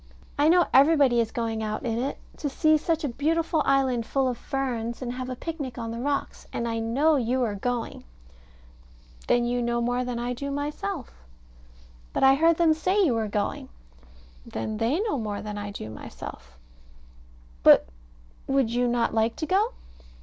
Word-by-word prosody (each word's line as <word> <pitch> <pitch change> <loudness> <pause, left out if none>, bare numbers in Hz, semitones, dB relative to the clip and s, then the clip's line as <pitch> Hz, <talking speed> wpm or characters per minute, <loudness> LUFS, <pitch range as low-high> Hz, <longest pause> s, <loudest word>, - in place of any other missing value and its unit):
I 295 +2 +3
know 350 +1 +5
everybody 275 -3 +5
is 230 -2 +1
going 225 -2 -2
out 215 0 -3
in 230 -1 -1
it 265 +3 -2 0.2
to 290 - -2
see 310 +3 +3
such 320 +1 0
a - - +1
beautiful 315 +5 0
island 265 -3 +2
full 270 -1 +1
of 250 - -1
ferns, 235 -3 -3
and 245 -2 -4
have 255 0 -5
a 255 - -3
picnic 285 -4 -5
on 230 -1 -4
the 230 - -5
rocks; 280 +2 -3
and 235 - -2
I 230 0 -2
know 280 +8 +2
you 250 +1 0
are 220 -3 -1
going. 235 +3 -3 1.2
Then 240 0 +3
you 245 0 0
know 235 0 0
more 245 +1 0
than 250 -1 -3
I 240 +1 -2
do 280 +3 -5
myself. 295 - -4 1.0
But - - 0
I 270 0 +8
heard 325 +3 +4
them 330 -2 +4
say 365 +6 0
you 270 - +2
were 225 -1 -1
going. 205 0 -2 0.7
Then 215 - -4
they 235 +9 +1
know 425 - -1
more 210 -2 -4
than 210 -1 -5
I 205 0 -5
do 200 - -7
myself. 65 - -10 1.0
But - - +7 0.6
would 270 -4 +2
you 245 +1 +1
not 240 -1 +1
like 225 +1 +1
to 315 - -3
go? 400 +8 +1
250 Hz, 180 wpm, -26 LUFS, 230-290 Hz, 1.2 s, I